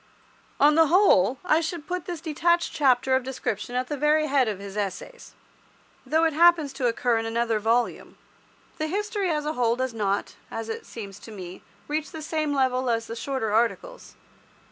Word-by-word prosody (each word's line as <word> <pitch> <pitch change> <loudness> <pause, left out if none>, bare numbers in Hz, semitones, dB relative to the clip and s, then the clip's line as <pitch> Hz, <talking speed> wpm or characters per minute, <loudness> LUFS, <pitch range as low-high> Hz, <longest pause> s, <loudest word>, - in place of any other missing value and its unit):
On 295 +2 +6
the 325 +1 +5
whole, 285 - +4
I 325 -2 +3
should 325 -1 -4
put 360 -1 -4
this 345 -3 -5
detached 340 +2 +1
chapter 260 -2 +3
of 260 - +2
description 245 -3 -4
at 250 +1 0
the 295 - -4
very 300 +2 +2
head 275 -4 +2
of 210 -3 -2
his 200 0 -9
Essays, 210 - -5 0.7
though 320 +1 +2
it 325 -1 +2
happens 330 -3 +4
to 265 -2 -1
occur 235 0 +1
in 225 - -3
another 230 -1 0
volume. 230 +3 -1 0.6
The 310 - -1
History 410 +2 -2
as 300 -2 -1
a 305 - -1
whole 235 -3 +1
does 260 -1 -2
not, 205 -2 -1 0.2
as 225 0 -5
it 225 - -6
seems 200 -3 -8
to 225 - -12
me, 185 -3 -9 0.3
reach 305 +1 -2
the 320 -3 -7
same 310 -1 -1
level 260 -2 +1
as 230 -1 0
the 230 - -7
shorter 235 -4 -2
articles. 240 - -1
265 Hz, 190 wpm, -25 LUFS, 230-315 Hz, 0.7 s, On